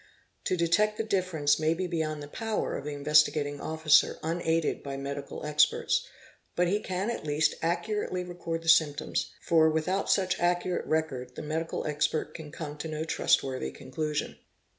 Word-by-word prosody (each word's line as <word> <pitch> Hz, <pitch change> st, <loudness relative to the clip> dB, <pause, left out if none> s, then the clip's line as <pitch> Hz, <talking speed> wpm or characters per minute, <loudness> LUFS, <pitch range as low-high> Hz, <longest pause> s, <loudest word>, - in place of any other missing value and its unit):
To 185 Hz, -, +1 dB
detect 190 Hz, +6 st, +2 dB
the -, -, 0 dB
difference 180 Hz, -9 st, +1 dB
may 160 Hz, +1 st, +2 dB
be 185 Hz, +2 st, -2 dB
beyond 155 Hz, -4 st, -2 dB
the -, -, -8 dB
power 220 Hz, +7 st, -2 dB
of 140 Hz, -, -5 dB
the 150 Hz, -, -3 dB
Investigating 145 Hz, 0 st, +2 dB
Officer 155 Hz, -1 st, +3 dB
unaided 165 Hz, 0 st, 0 dB
by 140 Hz, -1 st, -5 dB
medical 140 Hz, +1 st, -5 dB
experts, 150 Hz, -, +2 dB, 0.5 s
but 175 Hz, 0 st, +2 dB
he 200 Hz, +4 st, +1 dB
can 190 Hz, +2 st, -2 dB
at -, -, -5 dB
least 150 Hz, +1 st, +2 dB
accurately 180 Hz, +2 st, -1 dB
record 175 Hz, -2 st, -4 dB
_ -, -, -15 dB
the 165 Hz, -, -1 dB
symptoms, 155 Hz, -2 st, +3 dB
for 160 Hz, -1 st, +4 dB
without 170 Hz, +5 st, 0 dB
such 185 Hz, -2 st, +2 dB
accurate 175 Hz, +1 st, 0 dB
record 135 Hz, -6 st, -2 dB
the -, -, -6 dB
medical 160 Hz, +2 st, -3 dB
expert 150 Hz, 0 st, -1 dB
can 155 Hz, -3 st, -9 dB
come 150 Hz, -2 st, -7 dB
to 160 Hz, -, -4 dB
no 155 Hz, 0 st, -3 dB
trustworthy 130 Hz, -, +1 dB
conclusion. 150 Hz, -, -4 dB
160 Hz, 165 wpm, -29 LUFS, 150-175 Hz, 0.5 s, for